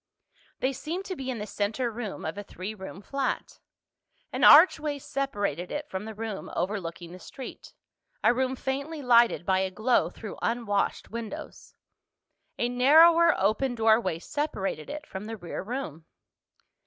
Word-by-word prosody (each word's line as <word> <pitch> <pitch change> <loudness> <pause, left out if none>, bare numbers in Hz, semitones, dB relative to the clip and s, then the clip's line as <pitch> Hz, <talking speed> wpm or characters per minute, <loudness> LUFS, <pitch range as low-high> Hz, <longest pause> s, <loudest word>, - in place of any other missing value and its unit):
They 265 +1 +1
seemed 335 +8 -5
to 375 - -4
be 265 -4 -5
in 250 - -2
the 210 - -4
center 215 +4 -2
room 220 -3 -6
of 160 - -3
a 205 - -5
three 195 +1 -7
room 190 -1 -9
flat. 275 +3 -3 0.7
An - - -1
archway 300 -5 +7
separated 205 - -3
it 295 0 -4
from 190 +2 -4
the 220 -1 -7
room 220 -2 -5
overlooking 175 -3 -3
the 180 - -10
street—a 265 - -5
room 260 +1 0
faintly 280 +4 -4
lighted 235 -6 +4
by 190 0 +2
a 190 0 0
glow 220 +6 +2
through 215 - -9
unwashed 230 -4 -1
windows. 230 -1 -7 0.8
A 240 - +1
narrower 320 +7 +6
open 220 +6 +1
doorway 220 -6 +3
separated 195 - -3
it 300 +1 -6
from 190 -4 -7
the 225 +1 -6
rear 175 -4 -6
room. 190 - -6
230 Hz, 150 wpm, -27 LUFS, 195-270 Hz, 0.8 s, archway